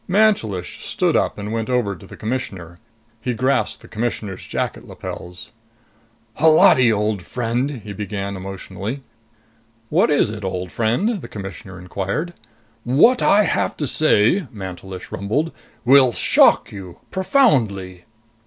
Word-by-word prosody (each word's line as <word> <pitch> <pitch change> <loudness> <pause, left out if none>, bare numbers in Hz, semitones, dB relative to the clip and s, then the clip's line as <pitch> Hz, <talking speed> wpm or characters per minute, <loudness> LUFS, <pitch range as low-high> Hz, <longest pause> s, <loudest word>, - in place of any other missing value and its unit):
Mantelish 180 - +1
stood - - 0
up - - +1
and 105 +1 -5
went 115 +1 -2
over 120 -6 0
to 95 - -14
the - - -12
Commissioner. 95 -8 -5 0.4
He 125 -2 -2
grasped 130 +3 0
the - - -12
Commissioner's 110 -4 -4
jacket - - -3
lapels. 90 +6 -8 0.9
"Holati, 150 -6 +6
old 105 -2 0
friend!" 120 +6 -2
he 105 0 -7
began 100 -1 -4
emotionally. 95 +6 -6 0.9
"What 165 +3 +3
is 145 -7 +2
it, 105 -1 -7
old 90 -1 -4
friend?" 175 - 0
the - - -8
Commissioner 95 -2 -8
inquired. 100 - -4 0.5
"What 160 - +4
I 210 +1 +5
have 185 - -1
to 150 - -2
say," 155 - +3
Mantelish 95 -2 -8
rumbled, 115 - -1 0.3
"will 130 -1 +6
shock - - +4
you. 95 -4 -9
Profoundly." 115 - +1
110 Hz, 130 wpm, -21 LUFS, 95-140 Hz, 0.9 s, Holati